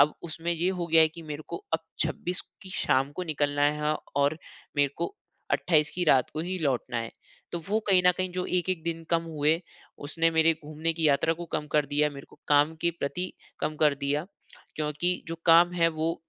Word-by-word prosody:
अब 145 +2 +5
उसमें 170 +1 -2
ये 170 +2 0
हो 180 -2 -2
गया 165 0 +5
है 160 - +6
कि 165 +2 -11
मेरे 150 -1 -6
को 170 - -4 0.2
अब 160 - +3 0.3
26 170 +4 -2 0.2
की 190 - -9
शाम 135 +2 +2
को 185 - -2
निकलना 145 -3 0 0.2
है 150 0 +1 0.2
और 140 +2 +2 0.4
मेरे 145 -1 +3
को 400 - -3 0.4
28 155 -3 +3
की 180 - 0
रात 135 -6 +4
को 155 - -2
ही 185 +2 -3
लौटना 130 -5 -1
है। 115 -1 -3 0.4
तो 170 - -2
वो 215 +2 +2
कहीं 185 -2 +5
न 180 - +7
कहीं 185 0 -1
जो 180 0 -2
1-1 180 -1 0
दिन 165 -1 -3
कम 165 -1 +3
हुए, 160 0 +1 0.4
उसने 165 +3 0
मेरे 160 0 +4
घूमने 155 +2 -2
की 160 -2 +2
यात्रा 140 +3 +3
को - - -3
कम 150 - -1
कर 150 -2 +3
दिया, 150 +2 +2
मेरे 140 -1 -10
को - - -18
काम 145 +2 +4
के 170 - +2
प्रति 180 +6 -2 0.3
कम 155 - -1
कर 150 -2 +5
दिया। 140 +3 -1 0.5
क्योंकि 155 +4 0
जो 165 - -3
काम 170 +1 +7
है 170 -1 +3
वो 160 +1 -1
160 Hz, 215 wpm, -28 LUFS, 150-170 Hz, 0.5 s, न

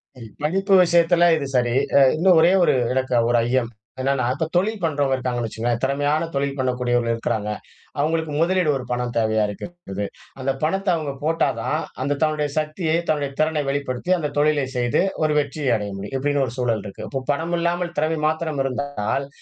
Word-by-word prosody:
சரி. 120 -3 -10 0.2
படிப்பு 195 +6 +1
விஷயத்துல 170 0 +4
இது 145 - -2
சரி. 120 -1 +1 0.2
அ - - +8 0.2
இன்னும் 175 +2 +4
ஒரே 170 +2 +5
ஒரு - - +4 0.2
எனக்கு 130 0 -1 0.2
ஒரு 120 - +3
ஐயம். 120 -1 +1 0.3
என்னன்னா, 135 -1 +1
இப்போ 145 +4 -2
தொழில் 210 +5 +1
பண்றவங்க 145 -4 +1
இருக்காங்கன்னு 125 -2 -2
வச்சுக்கோங்களேன், 115 +2 -2
திறமையான 145 +4 +1
தொழில் 140 0 -1
பண்ணக்கூடியவர்கள் 120 -2 0
இருக்குறாங்க. 110 -2 -2 0.5
அவங்களுக்கு 160 +1 0
முதலீடு 180 0 +2
ஒரு 130 - -6
பணம் 125 -1 -2
தேவையா 110 -1 +2
இருக்குது. 105 - -6 0.4
அந்த 135 +1 0
பணத்த 195 +6 0
அவங்க 155 -3 -3
போட்டா 165 +2 +2
தான், - - -1 0.2
அந்த 140 +1 -1
தன்னுடைய 155 -1 +1
சக்தியை, 155 +1 0
தன்னுடைய 145 -2 0
திறனை 155 0 +2
வெளிப்படுத்தி, 140 +3 -2
அந்த 150 -3 -2
தொழிலை 145 -1 +2
செய்து, 120 -1 +1 0.2
ஒரு 150 -1 +2
வெற்றியை 145 -1 -2
அடைய 105 -2 -3
முடியும். 100 +7 -6
இப்படின்னு 145 +1 +1
ஒரு 120 - -6
சூழல் 115 -5 0
இருக்கு. 100 - -7
இப்போ 135 - -3
பணம் 165 +4 -2
இல்லாமல், 175 0 -1
திறமை 155 +1 0
மாத்திரம் 155 -2 -1
இருந்தால், 135 -1 -2
145 Hz, 175 wpm, -22 LUFS, 125-160 Hz, 0.5 s, அ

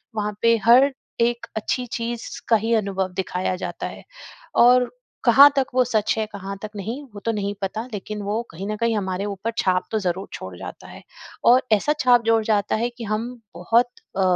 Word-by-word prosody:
वहाँ 210 -1 -2
पे 230 0 +5
हर 255 +4 +7 0.3
एक 235 0 +1
अच्छी 250 +3 -1
चीज़ 235 -1 -4 0.2
का 225 - +6
ही 230 - +1
अनुभव 195 -3 -1
दिखाया 185 0 -2
जाता 185 - -5
है। - - -10 0.5
और 250 +1 +5 0.3
कहाँ 285 +1 +9
तक 270 -1 +2
वो 255 - +5
सच 220 -4 +1
है, 220 - 0
कहाँ 195 -1 -6
तक 215 0 -6
नहीं? 225 +8 -5
वो 205 - -8
तो 230 - +2
नहीं 205 -1 -2
पता, 215 +4 -3
लेकिन 210 +1 -5
वो 205 +3 -1
कहीं 190 +5 -6
न 215 - -2
कहीं 230 0 +1
हमारे 190 -1 -2
ऊपर 205 +3 -3
छाप 185 -1 +1
तो 220 - +1
ज़रूर 185 0 -2
छोड़ 95 -1 -7
जाता - - -9
है। - - -11 0.4
और 250 +2 +6
ऐसा 295 +9 +2
छाप 245 -3 +5
जोड़ 225 -1 +3
जाता 210 -2 +1
है, 235 +2 0
कि 240 0 -10
हम 215 +2 -2 0.3
बहुत 230 +8 +3 0.3
अ, - - +2
215 Hz, 200 wpm, -23 LUFS, 195-235 Hz, 0.5 s, कहाँ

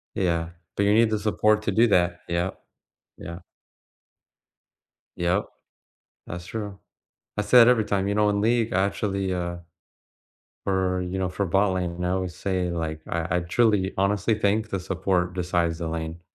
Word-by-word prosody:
Yeah, 85 -3 0 0.3
but 100 - +2
you 100 +1 +4
need 115 +1 +5
the 110 -1 0
support 105 0 +2
to 105 - 0
do 115 +4 +5
that, 85 -4 +2
yup. 85 +2 -2 0.5
Yeah. 85 +1 -8 1.8
Yup. 90 +4 0 0.8
That's 85 +1 -6
true. 105 -1 -5 0.6
I - - +2
say 120 +4 +7
it 115 - +7
every 120 -3 +4
time, 100 -2 0
you 100 - 0
know, 105 0 +3
in 100 0 0
League, 115 +1 +1
I 95 +1 +3
actually, 100 -2 -2
uh, 85 -1 -3 1.1
for, 95 -1 0
you 90 +1 -3
know, 95 -1 -1
for 100 +2 -2
bot-lane, 90 -2 0
I 90 - 0
always 95 -2 -2
say, 95 -2 -1
like, 80 -2 -3
I 85 +1 -1
I - - +2
truly 100 +1 +2
honestly 100 +3 +2
think 105 +1 +1
the 100 - -2
support 90 -1 -1
decides 85 -2 0
the 85 - -3
lane. 80 +1 -4
95 Hz, 165 wpm, -25 LUFS, 85-105 Hz, 1.8 s, say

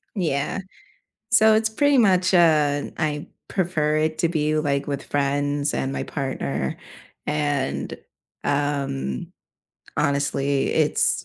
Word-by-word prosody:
Yeah. 155 -3 -1 0.7
So, 220 -2 +6
it's 220 0 +2
pretty 285 +5 +3
much, 190 -4 +4
uh, 150 -4 +4
I 150 -2 -2 0.2
prefer 160 -5 0
it 155 0 0
to 170 - +2
be, 155 -2 0
like, 140 -2 0
with 140 -2 -3
friends 145 +1 0
and 135 +1 -1
my - - -2
partner, 70 - -3 0.5
and, 145 -2 -1 0.5
um, 140 - -1 0.6
honestly, 140 -1 +1
it's - - +1
145 Hz, 110 wpm, -23 LUFS, 140-170 Hz, 0.7 s, So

